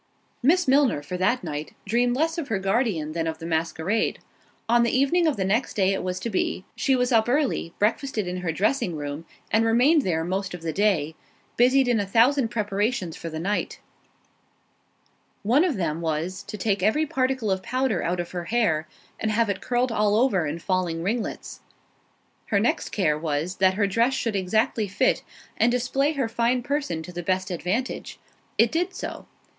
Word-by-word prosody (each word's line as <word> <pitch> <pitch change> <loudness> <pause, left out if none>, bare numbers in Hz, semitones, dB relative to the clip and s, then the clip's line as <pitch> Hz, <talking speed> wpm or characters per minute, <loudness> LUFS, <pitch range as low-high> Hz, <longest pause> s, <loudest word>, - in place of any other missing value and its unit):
Miss 340 +7 +3
Milner, 260 - +3
for 180 - -5
that 215 +6 +1
night, 150 -2 -5
dreamed 240 +4 +1
less 325 +4 0
of 305 - -4
her 225 - 0
guardian 195 - 0
than 165 0 -2
of 160 0 -3
the 165 - -8
masquerade. 165 +5 0 0.5
On 235 +1 +4
the 235 - +3
evening 325 +6 +3
of 305 - +1
the 190 - 0
next 215 +7 0
day 195 -1 +2
it 195 - -2
was 185 0 -3
to 230 - -3
be—she 210 +7 -1
was 250 0 +1
up 225 0 +3
early, 260 - 0
breakfasted 215 -1 0
in 180 +1 -3
her 180 -2 -2
dressing 205 - 0
room, 145 +2 -5 0.3
and 220 +1 +3
remained 250 +8 +4
there 165 -8 0
most 190 +2 -2
of 170 - -11
the 160 -1 -2
day, 185 -7 +1 0.4
busied 255 +2 +4
in 240 -3 +2
a 200 - -2
thousand 240 +5 +4
preparations 205 -4 -1
for 165 - -6
the 160 0 -5
night; 200 +5 -2 1.6
one 245 +10 +4
of 350 -7 +1
them 165 -3 -2
was, 165 +4 -2
to 210 - -8
take 200 -2 0
every 220 +11 +2
particle 260 -7 0
of 190 0 0
powder 255 -2 0
out 175 +1 -1
of 175 - -4
her 175 -1 -4
hair, 170 -8 +1 0.3
and 220 - -1
have 220 0 +2
it 190 0 -5
curled 245 0 0
all 210 -2 +2
over 215 - +2
in 150 +3 -3
falling 170 -2 -1
ringlets. 220 +4 -3 0.9
Her 200 - +2
next 225 - 0
care 155 -7 +1
was, 160 +3 -2
that 190 0 +3
her 205 0 +2
dress 230 +7 +2
should 230 -5 -1
exactly 215 +3 +1
fit, 190 - +1 0.4
and 235 +2 +3
display 270 +4 +1
her 270 -5 -1
fine 235 +2 0
person 275 - -2
to 180 - -9
the 175 0 -5
best 185 +2 -1
advantage—it 190 +9 -2
did 355 +3 -1
so. - - -6
210 Hz, 185 wpm, -25 LUFS, 180-245 Hz, 1.6 s, On